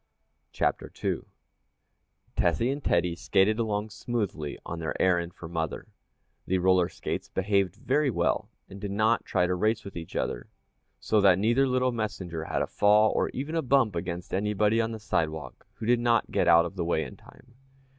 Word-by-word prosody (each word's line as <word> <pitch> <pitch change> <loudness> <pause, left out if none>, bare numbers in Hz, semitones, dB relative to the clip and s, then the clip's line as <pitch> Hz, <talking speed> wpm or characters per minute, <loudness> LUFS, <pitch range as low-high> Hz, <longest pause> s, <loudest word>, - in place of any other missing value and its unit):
CHAPTER - - -1
II - - 0 1.2
Tessie 115 +9 +2
and 140 0 -4
Teddy 85 0 +1
skated 100 +5 +2
along 105 -1 -1
smoothly 105 - -3
on 85 - -5
their 80 - -4
errand 85 -2 +1
for 85 - -9
mother. 80 -2 -4 0.6
The 95 - +2
roller 90 -1 +3
skates - - -5
behaved 100 -1 0
very 135 +5 +1
well, 120 - 0 0.2
and 100 +1 -11
did 100 - -3
not 110 +3 +1
try 90 -2 +1
to 90 - 0
race 110 +4 0
with 100 - -9
each 80 -2 -8
other, - - -3 0.5
so 110 -1 +2
that 95 -3 +6
neither 120 +7 +3
little 130 0 +1
messenger 95 -8 -4
had - - -1
a - - -4
fall, 105 +1 +4
or - - 0
even 145 +5 -5
a 165 - +1
bump 130 - +2
against 85 +1 -4
anybody 105 +3 +2
on 115 0 -2
the 110 - -6
sidewalk 80 -7 -3
who - - -7
did 120 +1 +3
not 120 -1 +2
get - - +1
out 85 0 +6
of 95 +3 -7
the 85 - 0
way 80 -2 +1
in - - -9
time. 125 - -19
100 Hz, 185 wpm, -27 LUFS, 85-115 Hz, 1.2 s, that